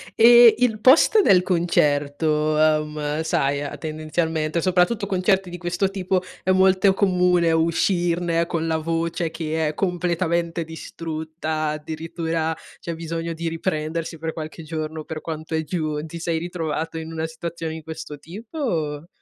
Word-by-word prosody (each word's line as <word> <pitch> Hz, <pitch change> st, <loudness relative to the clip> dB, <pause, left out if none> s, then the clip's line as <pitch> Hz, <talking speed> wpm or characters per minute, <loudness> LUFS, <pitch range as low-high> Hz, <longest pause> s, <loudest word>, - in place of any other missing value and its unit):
E 235 Hz, -1 st, +8 dB
il 230 Hz, -4 st, +2 dB
post 300 Hz, -, +6 dB
del 180 Hz, -, +5 dB
concerto, 155 Hz, -3 st, +1 dB
uhm, 150 Hz, 0 st, +1 dB
sai 140 Hz, -3 st, 0 dB, 0.2 s
tendenzialmente, 155 Hz, +1 st, -2 dB
soprattutto 185 Hz, +4 st, +2 dB
concerti 190 Hz, -1 st, +1 dB
di 175 Hz, -, -6 dB
questo 175 Hz, +2 st, -1 dB
tipo, 185 Hz, -1 st, 0 dB, 0.2 s
è 185 Hz, -, +2 dB
molto 190 Hz, +1 st, +4 dB
comune 180 Hz, -3 st, +3 dB
uscirne 170 Hz, +1 st, +1 dB
con 165 Hz, -1 st, -2 dB
la 160 Hz, -1 st, 0 dB
voce 165 Hz, +1 st, -2 dB
che 160 Hz, -1 st, -2 dB
è 150 Hz, -, -2 dB
completamente 170 Hz, -1 st, -1 dB
distrutta, 160 Hz, -1 st, -4 dB
addirittura 160 Hz, +1 st, -3 dB, 0.2 s
c'è 170 Hz, -, -5 dB
bisogno 165 Hz, 0 st, -4 dB
di 165 Hz, 0 st, -3 dB
riprendersi 165 Hz, -1 st, -3 dB
per 160 Hz, +1 st, -3 dB
qualche 160 Hz, +1 st, -7 dB
giorno 155 Hz, 0 st, -4 dB
per 155 Hz, +1 st, -6 dB
quanto 160 Hz, 0 st, -6 dB
è 160 Hz, 0 st, 0 dB
giù, 155 Hz, -2 st, -2 dB
ti 165 Hz, +1 st, -8 dB
sei 165 Hz, 0 st, -1 dB
ritrovato 165 Hz, -2 st, -3 dB
in 160 Hz, 0 st, -6 dB
una 160 Hz, 0 st, -3 dB
situazione 165 Hz, 0 st, -5 dB
di 160 Hz, -, -8 dB
questo 160 Hz, -1 st, -7 dB
tipo, 205 Hz, -, -10 dB
o? 155 Hz, -, -2 dB
165 Hz, 145 wpm, -23 LUFS, 155-175 Hz, 0.2 s, E